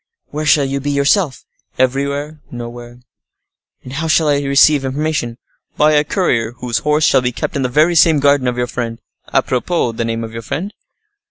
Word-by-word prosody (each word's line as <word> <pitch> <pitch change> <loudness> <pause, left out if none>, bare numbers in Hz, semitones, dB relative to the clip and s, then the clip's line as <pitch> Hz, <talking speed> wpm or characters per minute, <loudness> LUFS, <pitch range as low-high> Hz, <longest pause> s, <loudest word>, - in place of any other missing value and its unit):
"Where 150 +1 -4
shall 145 -1 +4
you 135 +1 -2
be 140 +2 -3
yourself?" 140 +2 +1 0.3
"Everywhere; 140 +4 -1
nowhere." 120 0 -9 0.8
"And 130 - -9
how 160 +4 -3
shall 155 -1 +3
I 145 -1 +2
receive 140 +1 +4
information?" 135 -3 -2 0.4
"By 150 +1 +4
a 150 -1 +3
courier 120 - 0
whose 120 -2 -3
horse 150 +1 +1
shall 135 - +4
be 125 0 -1
kept 160 +8 -4
in 140 - -1
the 130 - 0
very 155 +7 +3
same 160 -2 +5
garden 140 -2 +3
of 125 0 -1
your 125 - 0
friend. 120 -2 -5 0.3
A - - +1
propos, 125 -2 -1
the 115 - -1
name 115 0 -3
of 110 0 -7
your 115 - -6
friend?" 175 - -5
140 Hz, 190 wpm, -17 LUFS, 120-150 Hz, 0.8 s, same